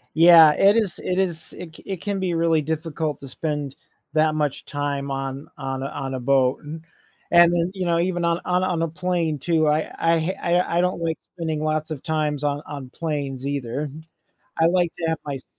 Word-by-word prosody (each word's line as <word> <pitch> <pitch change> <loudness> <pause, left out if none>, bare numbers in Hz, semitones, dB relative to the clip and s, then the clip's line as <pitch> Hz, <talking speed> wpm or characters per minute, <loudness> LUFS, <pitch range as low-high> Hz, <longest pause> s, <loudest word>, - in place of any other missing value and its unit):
Yeah, 165 -1 +9
it 200 +7 +5
is 210 -6 0
it 180 - -1
is 180 -4 0
it 165 -3 -9
c - - -14
it 195 - -3
can 200 -1 -2
be 180 -2 -1
really 165 -1 +2
difficult 155 0 -3
to 135 - -8
spend 145 0 -3 0.4
that 155 0 +3
much 150 -3 -1
time 140 -1 -3
on 135 +1 -4
on 135 -1 -4
a 135 - -2
on 135 -1 -5
a 130 - -3
boat. 130 0 +2
and 155 +2 -8 0.5
and 170 0 +7
then, 175 +1 0
you 185 -2 -3
know, 170 0 +2
even 175 0 0
on 170 0 +1
on 180 0 +1
on 175 -3 0
a - - +1
plane, 165 -2 -1
too, 155 +2 +1
I 150 +1 +1
I 165 0 +2
ha 175 +1 0
I 170 +1 +2
don't 180 -1 -1
like 165 -2 -1 0.2
spending 160 -3 -2
lots 155 0 -1
of 155 -4 -6
times 150 -2 -1
on 145 0 0
on 140 -3 -7
planes, 140 -5 -3
either. 140 +1 -3 0.7
I 165 - +6
like 175 -1 +2
to 165 - -2
have 160 -1 0
my 145 -2 -3
s 130 - -11
160 Hz, 210 wpm, -23 LUFS, 145-170 Hz, 0.7 s, Yeah